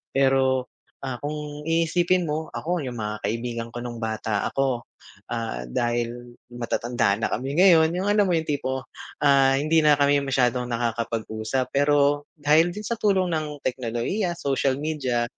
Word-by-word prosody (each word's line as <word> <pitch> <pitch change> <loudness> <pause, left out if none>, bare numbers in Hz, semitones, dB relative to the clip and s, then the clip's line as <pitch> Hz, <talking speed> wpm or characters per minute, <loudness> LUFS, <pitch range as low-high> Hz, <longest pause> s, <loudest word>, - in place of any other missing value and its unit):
Pero, 130 -1 +2 0.3
ah, 130 -2 -4
kung 150 +1 -5
iisipin 170 +2 +2
mo, 155 +1 -2
ako, 175 -2 -2
'yung 125 -2 -5
mga 105 0 -3
kaibigan 115 +2 -3
ko 120 - -5
nung 120 -1 -6
bata 110 -1 -1
ako, 130 -3 0 0.5
ah, 115 - -3
dahil 120 - -2 0.2
matatanda 120 -2 0
na 115 - 0
kami 135 +5 -2
ngayon, 170 -4 +6
'yung 185 - -1
alam 205 -2 +3
mo 175 - +2
'yung 160 - -1
tipo, 130 -3 -2 0.4
ah, 135 -2 +5
hindi 155 +4 +2
na 150 -1 +5
kami 145 0 +4
masyadong 125 -2 +1
nakakapag-usap. 115 +1 -2
Pero 145 0 +2
dahil 155 +3 +4
din 210 - -6
sa 230 +2 -3
tulong 190 -4 +2
ng 150 -2 -3
teknolohiya, 130 - -2
social 135 -4 0
media, 140 -5 -1
135 Hz, 150 wpm, -24 LUFS, 120-155 Hz, 0.5 s, ngayon